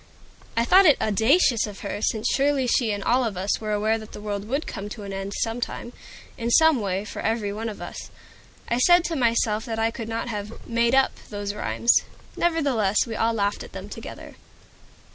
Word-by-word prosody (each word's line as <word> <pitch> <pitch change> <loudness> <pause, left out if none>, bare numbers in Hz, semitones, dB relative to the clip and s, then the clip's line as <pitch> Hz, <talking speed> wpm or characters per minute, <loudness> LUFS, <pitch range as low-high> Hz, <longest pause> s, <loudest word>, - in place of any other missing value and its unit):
I 230 - +3
thought 375 +7 +6
it 295 - +5
audacious 225 - +3
in 205 - -8
her, 200 +1 -5
since 220 0 0
surely 275 -1 +2
she 240 -2 +2
and 205 -1 -3
all 250 +2 +2
of 215 -6 -3
us 195 +4 -1
were 215 -1 -3
aware 215 +2 +1
that 215 - -11
the - - -8
world 205 -1 -4
would 275 +6 -1
come 205 -1 -6
to 210 0 -8
an 200 -1 -6
end 195 +1 -4
some 230 +1 -3
time, 240 0 -5 0.5
in 230 0 -1
some 320 0 +5
way, 195 0 -2
for - - -6
every 220 -2 -1
one 225 +2 -4
of 210 - -8
us. - - -8 0.6
I 235 - 0
said 350 +6 +6
to 335 - -2
myself 230 -4 +1
that 225 -3 -4
I 225 0 +1
could 225 -1 -6
not 225 +1 -3
have 210 -1 -6
"made 235 +2 +2
up" 270 0 +4 0.2
those 205 -1 -4
rhymes. 235 +3 +2 0.4
Nevertheless 275 - +1
we 230 -2 -5
all 225 +2 +1
laughed 205 -2 -1
at - - -13
them - - -8
together. - - -9
225 Hz, 210 wpm, -24 LUFS, 210-245 Hz, 0.6 s, thought